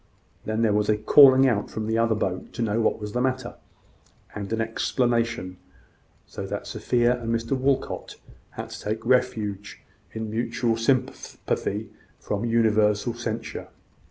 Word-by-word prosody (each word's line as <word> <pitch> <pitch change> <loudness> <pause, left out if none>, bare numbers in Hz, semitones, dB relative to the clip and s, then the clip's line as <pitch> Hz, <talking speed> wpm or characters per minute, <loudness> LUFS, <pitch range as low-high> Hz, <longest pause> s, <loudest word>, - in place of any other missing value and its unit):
Then 110 +1 -1
there 110 -2 +3
was 105 0 +1
a 105 - +3
calling 135 +3 +7
out 105 -5 0
from 110 - -4
the 110 +1 0
other 115 -1 +2
boat 95 -3 -3
to 120 - -2
know 110 +1 0
what 110 - +1
was 105 -1 -6
the 125 - 0
matter, 130 0 -1 0.8
and 100 -1 -6
an 115 - -1
explanation; 115 -3 -1 0.7
so - - -7
that - - -4
Sophia 120 0 +1
and 115 - -4
Mr 115 +1 -2
Walcot 135 +1 -1 0.3
had - - -8
to - - -8
take 110 +2 -3
refuge 110 -5 0 0.3
in 110 -1 -5
mutual 120 +1 0
sympathy 115 -4 -2 0.3
from 105 +2 -3
universal 110 -1 +2
censure. 115 -1 -5
115 Hz, 150 wpm, -25 LUFS, 105-120 Hz, 0.8 s, calling